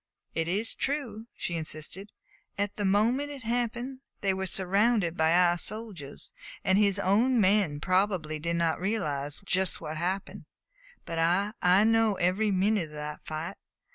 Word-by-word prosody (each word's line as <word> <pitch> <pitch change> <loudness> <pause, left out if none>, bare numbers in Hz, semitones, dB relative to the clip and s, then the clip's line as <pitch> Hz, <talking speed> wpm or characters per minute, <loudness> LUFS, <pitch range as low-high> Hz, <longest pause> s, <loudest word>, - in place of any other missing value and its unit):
"It 165 0 -1
is 205 +6 0
true," 240 -6 -3
she 175 - -3
insisted. 165 +5 -5 0.5
"At 205 0 -1
the 205 - -2
moment 230 +9 +2
it 280 -3 -8
happened 240 +2 -2 0.2
they 195 -2 +2
were 190 0 -3
surrounded 195 -1 +1
by 160 -1 +3
our 175 0 +4
soldiers, 205 -11 -4 0.3
and 190 +1 +3
his 200 -2 +3
own 220 +6 +3
men 190 -7 +3
probably 185 -3 0
did 170 +2 -1
not 170 -1 +1
realize 150 -9 -2
just 190 -2 0
what 155 +1 -5
happened. 185 +4 -3 0.6
But 165 -1 -3
I 180 +6 +2
I 180 +3 +5
know 225 -1 +3
every 190 +5 +1
minute 195 -2 +1
of 150 - -12
that 150 0 -6
fight! 160 +4 -5
190 Hz, 155 wpm, -29 LUFS, 170-215 Hz, 0.6 s, I